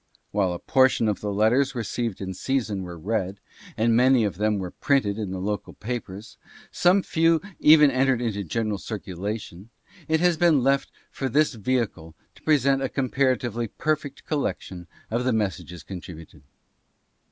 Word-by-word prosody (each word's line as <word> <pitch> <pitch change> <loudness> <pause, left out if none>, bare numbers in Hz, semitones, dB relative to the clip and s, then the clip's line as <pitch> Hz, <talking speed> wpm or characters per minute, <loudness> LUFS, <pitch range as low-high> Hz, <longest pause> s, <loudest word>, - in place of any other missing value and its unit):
While 100 -3 +1
a 90 - -3
portion 130 +1 +3
of 105 - -1
the 105 - -2
letters 125 +6 +2
received 115 -2 -3
in 95 -1 -4
season 110 -2 -2
were 90 -2 -7
read, 100 +2 -2 0.4
and 115 +1 +3
many 125 0 +5
of 100 -4 -2
them 105 0 +1
were 90 -2 -4
printed 110 -7 0
in 105 -3 -3
the 95 - -4
local 100 +3 -3
papers, 110 -2 -6
and - - -22
some 185 +2 +4
few 165 0 +2 0.2
even 150 -2 +7
entered 130 -1 +2
into 110 -4 -2
general 105 +3 -2
circulation, 100 -1 -6 0.4
it 160 0 +2
has 175 -1 +3
been 155 -6 +4
left 135 +1 +2 0.2
for 135 - -3
this 150 +4 +2
vehicle 105 -8 -2 0.2
to - - -20
present 140 -3 +2
a 135 - -1
comparatively 130 -3 0
perfect 145 +3 -3
collection 95 - -3 0.2
of 120 +2 0
the 130 -1 +1
mes 105 -5 0
sages 85 -2 -11
contributed. 80 -5 -10
115 Hz, 165 wpm, -25 LUFS, 100-135 Hz, 0.4 s, even